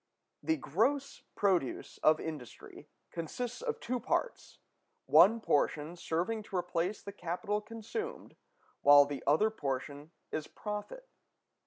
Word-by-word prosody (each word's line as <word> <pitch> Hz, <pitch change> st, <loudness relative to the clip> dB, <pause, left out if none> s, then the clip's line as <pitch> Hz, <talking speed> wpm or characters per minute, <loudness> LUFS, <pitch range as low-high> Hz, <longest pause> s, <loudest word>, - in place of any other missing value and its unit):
The 320 Hz, 0 st, +1 dB
gross 265 Hz, -, 0 dB
produce 185 Hz, -10 st, 0 dB
of 155 Hz, 0 st, +4 dB
industry 150 Hz, -7 st, -8 dB, 0.2 s
consists 230 Hz, -, -4 dB
of 485 Hz, -2 st, -2 dB
two 250 Hz, +1 st, -2 dB
parts; 365 Hz, -, -2 dB, 0.5 s
one 225 Hz, +3 st, +7 dB
portion 150 Hz, -3 st, 0 dB
serving 180 Hz, +6 st, -1 dB
to 195 Hz, -, -8 dB
replace 180 Hz, +2 st, -1 dB
the 200 Hz, -, -6 dB
capital 200 Hz, +3 st, -2 dB
consumed, 230 Hz, -, -6 dB, 0.5 s
while 145 Hz, 0 st, +8 dB
the 140 Hz, -1 st, -5 dB
other 210 Hz, +10 st, +4 dB
portion 145 Hz, -4 st, -4 dB, 0.2 s
is 155 Hz, -1 st, -3 dB
profit. 215 Hz, -, -6 dB
190 Hz, 120 wpm, -32 LUFS, 155-230 Hz, 0.5 s, while